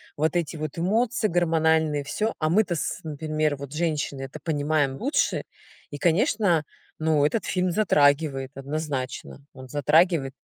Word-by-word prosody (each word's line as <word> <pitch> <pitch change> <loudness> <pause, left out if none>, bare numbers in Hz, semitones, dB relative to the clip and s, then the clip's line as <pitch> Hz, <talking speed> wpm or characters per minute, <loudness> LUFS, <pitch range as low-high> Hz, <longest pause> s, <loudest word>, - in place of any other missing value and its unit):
вот 155 +3 0
эти 170 -2 -1
вот 155 -1 -5
эмоции 220 +6 +1
гормональные, 160 -4 +2
всё. 215 +10 -2
А 155 0 +1
мы 210 +6 +4
то 180 -4 -3
с 155 - -3
например, 155 -1 -1
вот 140 0 -8
женщины, 150 -4 -2
это 135 +3 -7
понимаем 145 -2 0
лучше 280 - 0 0.5
и, 145 - -7
конечно, 175 +1 +2 0.4
ну, 155 -2 +2
этот 205 +8 0
фильм 185 -1 0
затрагивает, 145 -7 +2
однозначно, 140 -1 -5
он 130 -1 -11
затрагивает. 150 0 +2
155 Hz, 145 wpm, -25 LUFS, 145-170 Hz, 0.5 s, мы